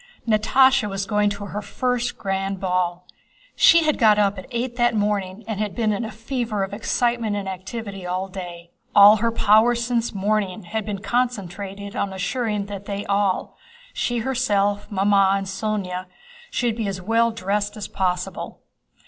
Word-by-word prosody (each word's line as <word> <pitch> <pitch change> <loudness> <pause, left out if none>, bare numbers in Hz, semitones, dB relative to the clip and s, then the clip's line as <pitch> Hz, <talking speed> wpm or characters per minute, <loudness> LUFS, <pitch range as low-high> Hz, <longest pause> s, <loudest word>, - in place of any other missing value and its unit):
Natásha 245 +2 +4
was 195 0 -3
going 210 0 +2
to 205 0 -5
her 205 +1 -5
first 250 +2 -2
grand 195 0 -2
ball. 180 -1 -1 0.5
She 335 0 +6
had 305 -1 +1
got 215 -4 +5
up 200 -1 +2
at 185 - -10
eight 240 0 -3
that 240 -1 +2
morning 205 -1 -1
and 220 -3 -3
had 210 -2 -2
been 220 -3 +1
in 205 - -2
a 225 - -4
fever 225 -2 -3
of 195 - -5
excitement 235 0 0
and 200 -1 -4
activity 195 +1 -6
all 180 +2 -2
day. 175 -2 -8 0.2
All 205 +1 +9
her 230 +2 0
powers 230 +2 +4
since 235 -1 0
morning 205 0 -1
had 215 +4 -4
been 200 -1 -4
concentrated 200 -3 -3
on 195 -1 -2
ensuring 210 +1 -2
that 200 -1 -7
they 200 0 -4
all—she 240 - -2
herself, 210 -5 0
Mamma, 195 0 +3
and 195 - -4
Sónya—should 215 - -4
be 225 -3 -2
as 195 -1 -3
well 230 +5 +2
dressed 205 -1 -2
as 205 - -5
possible. 185 0 -3
205 Hz, 160 wpm, -23 LUFS, 195-230 Hz, 0.5 s, All